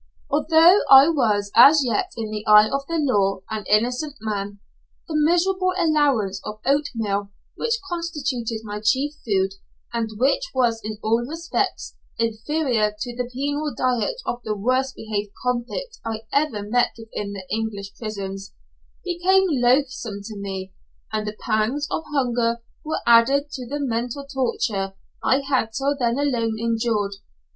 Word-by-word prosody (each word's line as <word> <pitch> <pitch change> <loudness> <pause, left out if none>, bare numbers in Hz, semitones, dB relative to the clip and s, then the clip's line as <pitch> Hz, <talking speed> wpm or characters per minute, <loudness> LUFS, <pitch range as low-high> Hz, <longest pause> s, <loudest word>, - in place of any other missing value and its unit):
Although 330 +5 +6
I 270 +3 +9
was 210 -10 +1
as 280 +5 +8
yet 230 -4 0
in 220 -2 -4
the 210 0 -4
eye 210 0 +8
of 275 +3 -3
the 335 - -1
law 200 -10 +1
an 215 -1 -4
innocent 250 +7 +1
man, 205 -2 -4 0.5
the 320 - -5
miserable 365 +4 +2
allowance 285 - +2
of 210 0 -7
oatmeal 225 -8 0 0.3
which 465 0 0
constituted 295 -10 -3
my 210 -1 -5
chief 275 +6 +2
food, 195 -3 +1 0.4
and 230 -1 -1
which 265 +4 +2
was 235 -3 +2
in 215 0 -5
all 230 +2 +2
respects 330 +2 -3 0.2
inferior 230 -1 0
to 245 -2 -5
the 245 0 -3
penal 285 +3 -2
diet 255 - 0
of 240 - -3
the 215 -1 -2
worst 255 +5 0
behaved 210 -2 -4
convict 250 - -3
I 225 -1 -4
ever 280 -8 +1
met 240 +4 +1
with 225 -1 -12
in 200 -1 -4
the 195 -2 -7
English 210 -3 -3
prisons, 195 -3 -6 0.5
became 370 +2 +3
loathsome 250 -5 +1
to 215 +1 -8
me, 190 -2 -6 0.4
and 215 -1 -1
the 210 0 -5
pangs 235 +6 0
of 320 - -2
hunger 240 -4 0 0.2
were 315 +1 -3
added 270 +5 +4
to 250 -3 -6
the 290 +4 -4
mental 245 +1 -2
torture 225 -8 -2 0.3
I 265 +2 +3
had 260 -5 0
till 275 +4 0
then 240 -2 0
alone 240 -6 0
endured. 225 -3 -1
240 Hz, 150 wpm, -23 LUFS, 215-285 Hz, 0.5 s, I